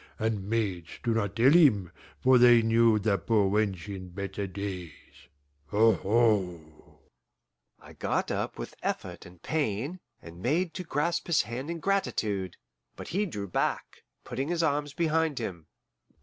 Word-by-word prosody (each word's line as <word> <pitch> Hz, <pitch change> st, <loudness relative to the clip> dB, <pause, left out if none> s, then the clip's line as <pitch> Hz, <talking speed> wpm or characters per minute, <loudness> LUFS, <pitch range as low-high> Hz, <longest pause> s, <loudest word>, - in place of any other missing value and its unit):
And 110 Hz, -3 st, -2 dB
maids 95 Hz, -7 st, -1 dB
do 120 Hz, -2 st, +1 dB
not 105 Hz, -3 st, -1 dB
tell 125 Hz, +5 st, +5 dB
him, 125 Hz, -, +5 dB, 0.3 s
for 130 Hz, -1 st, +6 dB
they 120 Hz, -1 st, +7 dB
knew 115 Hz, 0 st, +4 dB
the 100 Hz, -2 st, +1 dB
poor 100 Hz, 0 st, +2 dB
wench 100 Hz, -3 st, 0 dB
in 95 Hz, -2 st, -7 dB
better 100 Hz, +2 st, -5 dB
days 95 Hz, -4 st, -8 dB, 0.4 s
aho!" 105 Hz, -4 st, +3 dB, 1.2 s
I -, -, -14 dB
got -, -, -1 dB
up -, -, -3 dB
with -, -, -6 dB
effort -, -, -4 dB
and 90 Hz, -1 st, -16 dB
pain, 145 Hz, -, -2 dB, 0.2 s
and 85 Hz, +1 st, -12 dB
made 165 Hz, -, 0 dB
to 185 Hz, -, -5 dB
grasp 165 Hz, +1 st, -1 dB
his 170 Hz, -8 st, +3 dB
hand 120 Hz, +7 st, -6 dB
in 170 Hz, 0 st, -4 dB
gratitude, 105 Hz, -, -1 dB, 0.4 s
but -, -, -9 dB
he 200 Hz, +4 st, 0 dB
drew 100 Hz, -, -5 dB
back, 90 Hz, -, -2 dB, 0.2 s
putting 130 Hz, +3 st, -4 dB
his 170 Hz, 0 st, 0 dB
arms 145 Hz, -2 st, 0 dB
behind 160 Hz, -3 st, +1 dB
him. 90 Hz, -9 st, -5 dB
115 Hz, 150 wpm, -28 LUFS, 100-145 Hz, 1.2 s, they